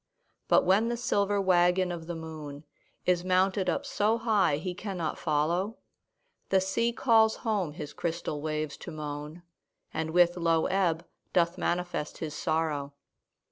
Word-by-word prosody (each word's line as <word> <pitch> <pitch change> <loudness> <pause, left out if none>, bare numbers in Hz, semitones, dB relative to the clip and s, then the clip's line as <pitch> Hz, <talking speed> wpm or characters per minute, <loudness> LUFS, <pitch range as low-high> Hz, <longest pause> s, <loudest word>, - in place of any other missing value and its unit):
But - - +4
when 200 +5 +3
the 240 - -1
silver 205 -5 +1
waggon 180 -1 +3
of 165 -2 -6
the 175 - -4
moon 155 -3 -8 0.4
Is 180 -1 +2
mounted 185 +1 +2
up - - -1
so 215 +2 +1
high 205 -10 +2
he 180 +4 -4
cannot 180 -4 -3
follow, 170 +7 0 0.7
The 190 - +4
sea 190 +5 0
calls 225 -2 +4
home 200 -9 0
his 150 -2 -7
crystal 165 -3 -3
waves 155 -1 -3
to - - -9
moan, 150 +1 -6 0.5
And 160 0 -2
with 175 +1 +4
low 165 -2 +2
ebb 175 -3 +1 0.3
doth 170 -1 +3
manifest 175 -3 -2
his 155 -2 -5
sorrow. 150 -3 -1
175 Hz, 145 wpm, -29 LUFS, 160-195 Hz, 0.7 s, But